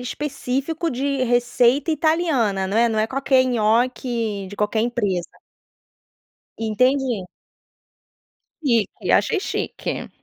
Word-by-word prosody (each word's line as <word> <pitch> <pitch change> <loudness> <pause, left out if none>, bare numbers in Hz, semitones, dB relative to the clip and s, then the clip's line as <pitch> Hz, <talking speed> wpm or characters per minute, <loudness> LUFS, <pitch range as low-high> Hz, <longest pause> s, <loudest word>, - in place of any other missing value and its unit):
específico 280 +4 -3
de 275 +1 -1
receita 245 +5 +2
italiana, 305 - +1
não 195 - -2
é? 235 +1 +4
Não 220 -1 -1
é 215 - +2
qualquer 265 0 +2
nhoque 230 -3 0
de 205 - -10
qualquer 210 +1 0
empresa. 205 -7 -1 1.3
Entendi. 245 -1 +1 1.4
Chique, 235 -7 +2 0.3
achei - - +1
chique. - - -4
245 Hz, 100 wpm, -22 LUFS, 220-275 Hz, 1.4 s, é